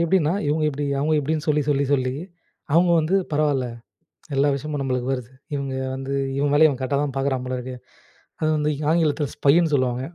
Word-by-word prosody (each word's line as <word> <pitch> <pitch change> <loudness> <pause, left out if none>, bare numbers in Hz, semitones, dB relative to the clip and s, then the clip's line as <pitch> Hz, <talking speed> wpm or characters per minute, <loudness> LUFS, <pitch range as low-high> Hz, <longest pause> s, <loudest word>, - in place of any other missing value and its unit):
எப்டின்னா 170 -2 +2
இவங்க 155 +2 +1
இப்டி 145 0 -3
அவங்க 155 +3 +1
இப்டின்னு 155 +3 -2
சொல்லி, 150 0 +3
சொல்லி, 140 -1 +2
சொல்லி 130 -2 +1 0.6
அவங்க 175 +2 +4
வந்து 160 +4 0 0.2
பரவாயில்ல 145 -4 +1 0.7
எல்லா 140 +2 +3
விஷயமும் 145 +1 -4
நம்மளுக்கு 130 -1 -1
வருது. 125 -2 -4 0.2
இவங்க 140 -1 -3 0.2
வந்து 135 +1 -4 0.2
இவ 145 +1 +1
வேலய 155 +1 +7
இவ 135 - -3
கரெக்டா 140 +2 0
தான் 145 -3 -3
பார்க்குறான் 135 -2 -1
போல 130 0 -3
இருக்கு. 125 +1 -6 0.6
அத 155 - -1
வந்து 150 0 0 0.2
ஆங்கிலத்தில 155 -3 +1
ஸ்பைன்னு 160 +2 +3
சொல்லுவாங்க. 130 -1 0
145 Hz, 175 wpm, -23 LUFS, 130-155 Hz, 0.7 s, வேலய